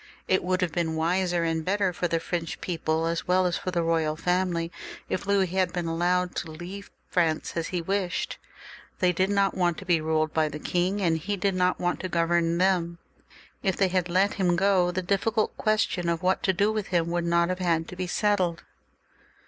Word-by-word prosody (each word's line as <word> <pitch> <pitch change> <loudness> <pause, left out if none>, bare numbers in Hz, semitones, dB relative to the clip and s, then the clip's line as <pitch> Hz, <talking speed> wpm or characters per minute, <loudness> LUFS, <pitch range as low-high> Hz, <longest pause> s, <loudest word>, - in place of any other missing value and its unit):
It 190 - +2
would 185 +1 0
have 180 -3 0
been 160 -1 -1
Mdser 175 +1 +1
and 160 -1 -1
better 195 +1 +1
for 175 - -1
the 165 -1 0
French 165 0 -4
people, 160 -2 -1
as 165 0 -2
well 185 +1 +3
as 175 -1 0
for - - -4
the 175 -2 0
royal 160 -2 +1
family, 175 0 0 0.4
if 185 - -3
Louis 200 -1 +3
had 185 0 0
been 175 -2 -3
allowed 175 +2 0
to 165 - -3
leave 175 +5 -8 0.2
JFrance 165 -3 +1
as 165 -1 -1
he 175 -2 -3
wished. 190 0 -2 0.6
They 180 -2 +3
did 185 +2 +1
not 200 -1 +2
want 175 -3 +1
to 195 - -8
be 170 -3 +2
ruled 155 0 0
by 155 -1 +2
the 150 - -6
king, 180 +5 -1
and 165 -2 +2
he 205 +5 -3
did 195 +1 +1
not 180 0 +1
want 175 0 -1
to 185 - -4
govern 170 0 +1
them. 175 -2 +1 0.6
If 190 -3 0
they 195 -2 +3
had 180 -1 0
let 190 +3 +2
him 180 -3 +1
go, 190 -1 +3
the 185 +1 -2
difficult 205 +4 0
question 215 -5 0
of 170 0 -1
what 185 +1 +2
to 190 - +2
do 200 +3 +2
with 215 -2 -2
him 170 -2 0
would 175 0 0
not 170 0 +2
have 185 0 -2
had 165 -2 +1
to - - -8
be 180 0 -3
settled. 185 -3 0
180 Hz, 215 wpm, -26 LUFS, 170-190 Hz, 0.6 s, well